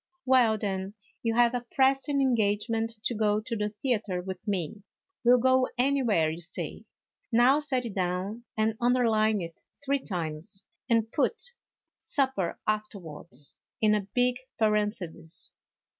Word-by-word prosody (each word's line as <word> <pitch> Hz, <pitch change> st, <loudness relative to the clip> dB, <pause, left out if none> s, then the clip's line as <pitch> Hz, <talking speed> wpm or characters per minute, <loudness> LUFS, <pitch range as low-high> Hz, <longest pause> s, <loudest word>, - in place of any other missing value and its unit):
" 355 Hz, 0 st, -47 dB
Well, 250 Hz, -4 st, +5 dB
then, 195 Hz, -1 st, -3 dB, 0.3 s
you 225 Hz, -1 st, 0 dB
have 240 Hz, 0 st, +5 dB
a 245 Hz, -1 st, -2 dB
pressing 270 Hz, +1 st, +3 dB
engagement 225 Hz, -2 st, +1 dB
to -, -, +1 dB
go 210 Hz, -1 st, +2 dB
to 230 Hz, +1 st, -4 dB
the 210 Hz, -1 st, -1 dB
theatre 210 Hz, -4 st, -1 dB
with 185 Hz, 0 st, -5 dB
me; 195 Hz, 0 st, -2 dB, 0.4 s
we 240 Hz, -, +3 dB
'11 250 Hz, -1 st, +6 dB
go 260 Hz, 0 st, +4 dB
anywhere 245 Hz, -, +3 dB
you 165 Hz, +2 st, -6 dB
say. 175 Hz, -, -5 dB, 0.5 s
Now 245 Hz, +5 st, +5 dB
set 265 Hz, -4 st, -1 dB
it 225 Hz, -, -5 dB
down 190 Hz, +5 st, -2 dB
and 220 Hz, 0 st, +2 dB
underline 225 Hz, -4 st, +3 dB
it 165 Hz, -1 st, -8 dB, 0.2 s
three 280 Hz, 0 st, +2 dB
times, 180 Hz, -1 st, -4 dB, 0.2 s
and 225 Hz, -1 st, +2 dB
put 475 Hz, -, 0 dB, 0.2 s
' -, -, -63 dB
supper 265 Hz, -, +2 dB
afterwards 170 Hz, -10 st, -4 dB
' -, -, -66 dB
in 215 Hz, -1 st, +4 dB
a 205 Hz, -2 st, 0 dB
big 250 Hz, 0 st, +3 dB, 0.2 s
paren 210 Hz, -1 st, +3 dB
thesis." 165 Hz, -4 st, -8 dB
220 Hz, 155 wpm, -28 LUFS, 195-250 Hz, 0.5 s, 11